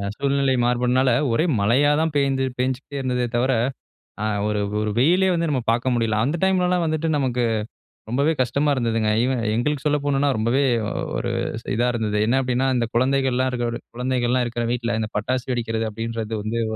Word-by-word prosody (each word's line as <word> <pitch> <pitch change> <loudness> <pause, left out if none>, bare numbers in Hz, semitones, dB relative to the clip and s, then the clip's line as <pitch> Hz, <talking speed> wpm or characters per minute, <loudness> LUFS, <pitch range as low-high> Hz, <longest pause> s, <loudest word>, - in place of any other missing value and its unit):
சூழ்நிலை 140 -1 +1
மாறுபாடுனால 125 +1 +2 0.2
ஒரே 155 +9 +2
மழையா 125 +9 +3
தான் 160 -1 0
பெய்து 135 -1 +1
பெஞ்சுகிட்டே 130 +3 -2
இருந்ததே 125 -2 -1
தவிர, 125 +3 +2 0.7
ஆ, - - -1 0.2
ஒரு 105 -1 -1 0.2
ஒரு 105 0 -1
வெயிலே 180 +8 +4
வந்து 170 -1 0
நம்ம 130 - 0
பார்க்க 120 +2 +1
முடியல. 115 -2 0
அந்த 145 +7 0
டைம்லலாம் 180 -2 +2
வந்துட்டு 155 +1 -1
நமக்கு 125 -3 0 0.6
ரொம்பவே 140 +7 +1
கஷ்டமா 140 +4 0
இருந்ததுங்க. 115 -4 0
ஈவன் 130 -2 0
எங்களுக்கு 145 +4 -1
சொல்ல 150 0 +3
போணும்னா 140 0 +2
ரொம்பவே 120 +6 +1 0.5
ஒரு - - -2 0.4
இதா 120 +3 +1
இருந்தது. 105 -2 -1
என்ன 130 +3 +3
அப்படின்னா, 125 +1 0
இந்த 120 -2 0
குழந்தைகள்லாம் 130 0 +2
இருக்கிற 120 -1 -2 0.2
குழந்தைகள்லாம் 125 0 0
இருக்கிற 120 0 -3
வீட்ல 120 -1 -1
இந்த 110 - -3
பட்டாசு 125 +3 -2
வெடிக்கிறது 115 -2 -2
அப்படின்றது 115 0 -4
வந்து 110 +2 -2
125 Hz, 160 wpm, -22 LUFS, 115-140 Hz, 0.7 s, வெயிலே